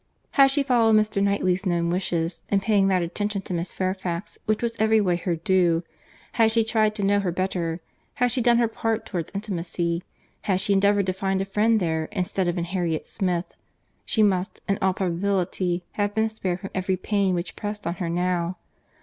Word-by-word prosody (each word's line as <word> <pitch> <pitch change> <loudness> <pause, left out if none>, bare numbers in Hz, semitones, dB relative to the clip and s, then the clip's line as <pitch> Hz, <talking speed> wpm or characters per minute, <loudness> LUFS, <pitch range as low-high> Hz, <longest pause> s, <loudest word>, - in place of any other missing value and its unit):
Had 275 -2 +6
she 275 +1 +1
followed 235 -5 +4
Mr. 215 -2 +2
Knightley's 200 -1 +1
known 170 -3 0
wishes, 175 -2 -1
in 200 - +3
paying 200 -1 +2
that 185 -2 +2
attention 205 +3 -3
to 185 - -5
Miss 170 0 -2
Fairfax, 185 0 -3
which 215 +2 +1
was 230 -1 -1
every 220 0 +4
way 185 -4 +2
her 175 0 -1
due; 170 0 +2 0.5
had 225 -2 +3
she 225 0 +3
tried 215 -1 +1
to 205 - -2
know 205 +1 +3
her 190 -3 -1
better; 175 -2 -2 0.3
had 245 0 +2
she 250 +2 0
done 235 0 +4
her 235 -1 +3
part 225 0 -2
towards 175 -4 -4
intimacy; 170 -4 -2 0.4
had 190 -3 +2
she 200 - +1
endeavoured 200 0 +3
to 185 - 0
find 190 0 -1
a 195 - -1
friend 215 +3 +2
there 160 -3 -1
instead 185 +1 -2
of 175 +1 -1
in 170 - 0
Harriet 170 -3 -2
Smith; 180 -2 -1 0.6
she 220 - +2
must, 190 -2 +1
in 195 - 0
all 190 -1 +2
probability, 180 -1 0
have 205 0 -1
been 220 0 +2
spared 190 -4 -3
from 195 - -7
every 190 0 0
pain 195 -1 +1
which 175 +1 -4
pressed 210 -1 -5
on 170 - -1
her 170 - -1
now. 175 0 -1
190 Hz, 200 wpm, -25 LUFS, 175-210 Hz, 0.6 s, Had